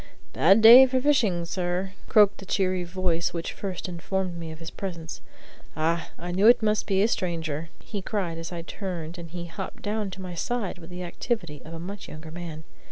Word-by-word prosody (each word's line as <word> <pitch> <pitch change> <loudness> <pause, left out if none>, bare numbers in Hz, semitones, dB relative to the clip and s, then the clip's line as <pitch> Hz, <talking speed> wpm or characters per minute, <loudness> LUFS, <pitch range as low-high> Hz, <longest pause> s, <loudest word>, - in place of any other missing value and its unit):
"Bad 195 +7 +5
day 245 +4 +11
for 260 0 +1
fishing, 230 -11 +2
sir," 180 +2 -2 0.2
croaked 205 -2 +5
the 195 - -9
cheery 185 -2 +1
voice 175 -1 -1
which 170 - -3
first 190 -3 -5
informed 180 +1 -3
me 165 -1 -6
of 160 - -9
his 165 0 -8
presence. 170 -4 -6 0.6
"Ah, 165 +1 0
I 175 +2 -5
knew 195 +4 +4
it 235 -1 +7
must 215 0 +1
be 195 -1 +3
a - - +4
stranger," 165 -6 -2
he 205 -3 -6
cried 185 -5 -2
as 165 +1 -6
I 170 -1 -5
turned 175 -3 -5
and 170 -1 -8
he 175 +1 -6
hopped 185 +3 -7
down 210 -1 -1
to 190 0 -8
my 180 -1 -6
side 200 0 -2
with 165 - -12
the 180 0 -6
activity 175 - -3
of 165 +1 -9
a - - -6
much 195 +4 -7
younger 155 +1 -9
man. 165 -2 -7
180 Hz, 205 wpm, -26 LUFS, 165-200 Hz, 0.6 s, day